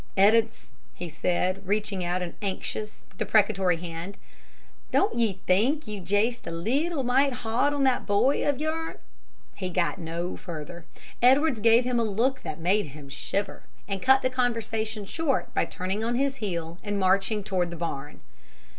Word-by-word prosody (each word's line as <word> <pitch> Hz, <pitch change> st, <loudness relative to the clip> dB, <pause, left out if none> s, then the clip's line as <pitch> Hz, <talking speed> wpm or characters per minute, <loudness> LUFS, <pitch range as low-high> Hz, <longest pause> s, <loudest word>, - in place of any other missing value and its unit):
"Ed'ards," 220 Hz, -, +3 dB, 0.2 s
he 175 Hz, -, -5 dB
said, 180 Hz, +4 st, 0 dB
reaching 205 Hz, -2 st, -1 dB
out 180 Hz, +1 st, -1 dB
an 175 Hz, -, -6 dB
anxious, 210 Hz, +2 st, -4 dB, 0.2 s
deprecatory 200 Hz, -4 st, +3 dB
hand, 170 Hz, +3 st, -6 dB, 0.7 s
"don't 405 Hz, -, +2 dB
ye 215 Hz, -5 st, 0 dB
think 240 Hz, +12 st, +2 dB
you're 210 Hz, -3 st, -5 dB
jest 205 Hz, +6 st, 0 dB
a -, -, -2 dB
leetle 270 Hz, -, 0 dB
mite 265 Hz, +2 st, +3 dB
hard 240 Hz, +6 st, +2 dB
on 285 Hz, -1 st, 0 dB
that 260 Hz, -2 st, +2 dB
boy 205 Hz, +7 st, +3 dB
o' 290 Hz, -, +2 dB
yourn 315 Hz, +3 st, -3 dB, 0.3 s
" -, -, -35 dB
He 185 Hz, -, -1 dB
got 180 Hz, +1 st, 0 dB
no 170 Hz, +1 st, -3 dB
further. 170 Hz, -1 st, -8 dB, 0.4 s
Edwards 265 Hz, +1 st, +5 dB
gave 230 Hz, +3 st, +5 dB
him 245 Hz, -1 st, 0 dB
a -, -, +2 dB
look 230 Hz, +5 st, 0 dB
that 150 Hz, -, -5 dB
made 185 Hz, +2 st, +2 dB
him 140 Hz, 0 st, -11 dB
shiver, 195 Hz, +8 st, -3 dB, 0.3 s
and 195 Hz, -2 st, -3 dB
cut 265 Hz, +1 st, +5 dB
the 255 Hz, -, +1 dB
conversation 225 Hz, -4 st, -1 dB
short 300 Hz, +4 st, -1 dB
by -, -, +2 dB
turning 190 Hz, +4 st, -3 dB
on 235 Hz, +1 st, 0 dB
his 275 Hz, +1 st, 0 dB
heel 170 Hz, -6 st, -4 dB
and 205 Hz, -1 st, -2 dB
marching 195 Hz, +3 st, +2 dB
toward 185 Hz, -4 st, 0 dB
the 170 Hz, -, -6 dB
barn. 150 Hz, -4 st, -5 dB
205 Hz, 165 wpm, -27 LUFS, 180-245 Hz, 0.7 s, Edwards